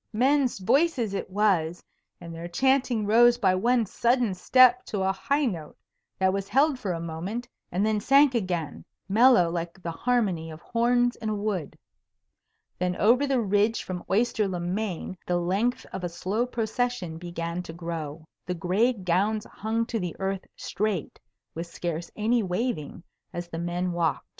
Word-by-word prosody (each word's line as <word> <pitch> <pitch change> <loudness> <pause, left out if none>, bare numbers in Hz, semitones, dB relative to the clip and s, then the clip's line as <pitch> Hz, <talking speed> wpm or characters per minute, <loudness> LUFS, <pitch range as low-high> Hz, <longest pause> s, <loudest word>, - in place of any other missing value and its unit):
Men's 260 +3 +2
voices 245 - +1
it 195 - -3
was, 185 -5 +1 0.4
and 170 -1 -9
their 165 +1 -6
chanting 255 +3 +1
rose 240 +3 +5
by 195 -6 +3
one 235 +5 +2
sudden 240 +1 +1
step 250 +6 +5
to 200 -3 -2
a 190 - +2
high 280 +9 0
note 170 - -4 0.4
that 190 0 +2
was 195 0 -3
held 275 +4 +3
for 200 -7 -2
a 170 - -3
moment, 175 +9 -5 0.2
and 190 +4 +1
then 215 -1 +1
sank 275 +4 +5
again, 180 -9 -2 0.2
mellow 210 -4 +5
like 170 +1 -4
the 170 -2 -4
harmony 190 -6 0
of 155 0 -9
horns 245 +3 +1
in 220 - -4
a 215 - -1
wood. 200 -7 -3 1.0
Then 180 0 0
over 245 +9 +3
the 265 -3 +2
ridge 210 +2 +1
from 180 -1 -5
Oyster 215 0 +2
le 180 -2 -3
Main 185 0 -3
the 175 - +1
length 195 +8 0
of 190 - -5
a 175 - -1
slow 200 +8 -2
procession 225 -7 -2
began 170 0 -4
to 180 - -8
grow. 165 -2 -6 0.2
The 180 - -2
gray 190 +9 +2
gowns 200 +2 0
hung 225 +2 -2
to 230 -1 -3
the 180 -3 -4
earth 195 0 -3
straight 205 -5 -3 0.3
with 165 +1 -5
scarce 170 0 -4
any 225 +3 +2
waving 185 - -3 0.3
as 175 0 -5
the 165 - -5
men 175 +1 -2
walked. 170 -2 -1
195 Hz, 165 wpm, -26 LUFS, 175-240 Hz, 1.0 s, rose